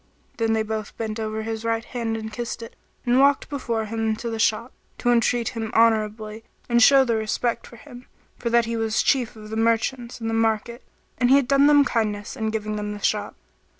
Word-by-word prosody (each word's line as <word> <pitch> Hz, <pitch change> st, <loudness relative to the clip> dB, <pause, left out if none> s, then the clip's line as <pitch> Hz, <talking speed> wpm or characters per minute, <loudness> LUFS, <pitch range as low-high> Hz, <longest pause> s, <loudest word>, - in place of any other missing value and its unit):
Then 225 Hz, -1 st, +1 dB
they 220 Hz, 0 st, +1 dB
both 220 Hz, -1 st, -5 dB
bent 220 Hz, -1 st, -4 dB
over 220 Hz, 0 st, -3 dB
his 225 Hz, 0 st, -4 dB
right 230 Hz, 0 st, -1 dB
hand 230 Hz, -2 st, -3 dB
and 220 Hz, -1 st, -7 dB
kissed 235 Hz, 0 st, -5 dB
it 230 Hz, -, -11 dB, 0.3 s
and 245 Hz, +1 st, +3 dB
walked 280 Hz, 0 st, +3 dB
before 235 Hz, -6 st, -2 dB
him 220 Hz, 0 st, -1 dB
to 230 Hz, +1 st, -5 dB
the 225 Hz, -, -4 dB
shop, 230 Hz, +2 st, 0 dB, 0.2 s
to 245 Hz, -, +1 dB
entreat 235 Hz, 0 st, +2 dB
him 225 Hz, -2 st, -4 dB
honourably 220 Hz, -1 st, +1 dB, 0.2 s
and 235 Hz, 0 st, +3 dB
show 270 Hz, +3 st, +7 dB
their 230 Hz, -2 st, +1 dB
respect 225 Hz, +2 st, -2 dB
for -, -, -14 dB
him, 245 Hz, +1 st, -13 dB, 0.3 s
for 235 Hz, -, -2 dB
that 235 Hz, 0 st, +3 dB
he 230 Hz, 0 st, -3 dB
was 225 Hz, -1 st, 0 dB
Chief 245 Hz, -4 st, +1 dB
of 215 Hz, 0 st, -11 dB
the 220 Hz, -, -3 dB
Merchants 230 Hz, +2 st, 0 dB
and 225 Hz, -, -4 dB
the 225 Hz, -, -1 dB
market, 225 Hz, +2 st, 0 dB, 0.4 s
and 245 Hz, -1 st, +3 dB
he 270 Hz, -, +7 dB
had 280 Hz, -3 st, +3 dB
done 275 Hz, +1 st, +5 dB
them 290 Hz, -1 st, +6 dB
kindness 210 Hz, -5 st, -2 dB
in 220 Hz, -1 st, -2 dB
giving 215 Hz, -1 st, -3 dB
them 210 Hz, 0 st, -4 dB
the 205 Hz, -, -9 dB
shop. 210 Hz, -1 st, -1 dB
225 Hz, 215 wpm, -23 LUFS, 220-240 Hz, 0.4 s, show